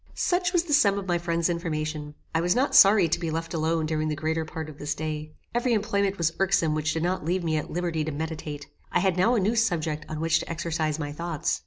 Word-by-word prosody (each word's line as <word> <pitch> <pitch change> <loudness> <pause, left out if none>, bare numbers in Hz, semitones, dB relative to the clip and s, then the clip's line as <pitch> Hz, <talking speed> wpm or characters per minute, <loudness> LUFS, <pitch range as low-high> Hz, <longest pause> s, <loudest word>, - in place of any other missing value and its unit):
Such 355 -1 +1
was 350 -2 +2
the 320 -4 -2
sum 205 -9 +4
of 200 - -4
my 175 -2 0
friend's 170 -1 0
information. 155 -3 -3 0.2
I 165 - +2
was 180 +2 +2
not 270 +2 +1
sorry 200 -7 +7
to 165 - 0
be 170 -2 -2
left 165 +2 -3
alone 160 0 0
during 155 0 -1
the 155 - -1
greater 160 +2 -1
part 160 0 -6
of 150 -2 -11
this 145 0 -2
day. 155 0 -5 0.2
Every 240 +1 +1
employment 200 -2 0
was 165 -1 +1
irksome 185 -5 +2
which 155 0 0
did 160 - -2
not 180 0 -1
leave 175 +3 0
me 160 -2 0
at 150 - -4
liberty 170 -2 -1
to 155 - -3
meditate. 150 -1 -5 0.3
I - - +2
had 190 -1 +2
now 220 +7 +3
a - - +3
new 205 +4 +1
subject 165 -9 0
on 155 - -4
which 165 0 +2
to - - -7
exercise 160 -2 -1
my 145 -2 -4
thoughts. 165 +1 -2
165 Hz, 245 wpm, -26 LUFS, 155-190 Hz, 0.3 s, sorry